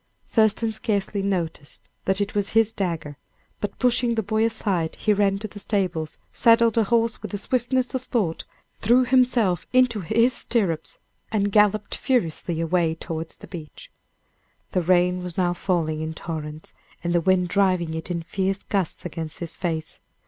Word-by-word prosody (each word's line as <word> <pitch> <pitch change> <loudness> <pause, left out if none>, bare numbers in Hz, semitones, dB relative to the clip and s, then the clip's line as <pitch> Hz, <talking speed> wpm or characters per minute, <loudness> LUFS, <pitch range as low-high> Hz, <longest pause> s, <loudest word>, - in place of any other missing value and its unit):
Thurston 220 0 +2
scarcely 205 -2 -1
noticed 170 -7 -3 0.2
that 190 +1 +1
it 200 -1 -1
was 205 -1 0
his 225 -1 +4
dagger, 165 -6 -3 0.4
but 205 -1 -4
pushing 245 -1 +2
the 220 - 0
boy 220 +3 +1
aside, 190 -7 -1
he 215 - +2
ran 200 -1 +2
to 215 +2 -5
the 205 0 -11
stables, 185 -6 -2 0.2
saddled 230 -1 +5
a 225 -2 +3
horse 230 +1 +1
with - - -5
the 205 - -3
swiftness 255 +4 0
of 260 - -1
thought, 205 -10 -1 0.3
threw 240 +4 +4
himself 245 -8 +2
into 250 -4 +4
his 230 +7 +2
stirrups, 185 -12 -1 0.3
and 205 -2 +1
galloped 210 0 +3
furiously 175 -8 -1
away 165 -1 +1
towards 165 -1 -6
the - - -12
beach. 175 - -10 0.8
The 185 - +1
rain 180 +1 +3
was 180 -2 -6
now 175 -2 +2
falling 165 -4 -1
in 160 0 -4
torrents, 155 -2 -6 0.3
and 170 0 0
the 175 - +3
wind 180 0 +2
driving 185 -4 +2
it 160 +2 -4
in 170 -2 -2
fierce 195 +3 -2
gusts 195 -4 -2
against 160 -2 -5
his 170 -2 -6
face. 160 -3 -3
195 Hz, 165 wpm, -24 LUFS, 170-220 Hz, 0.8 s, saddled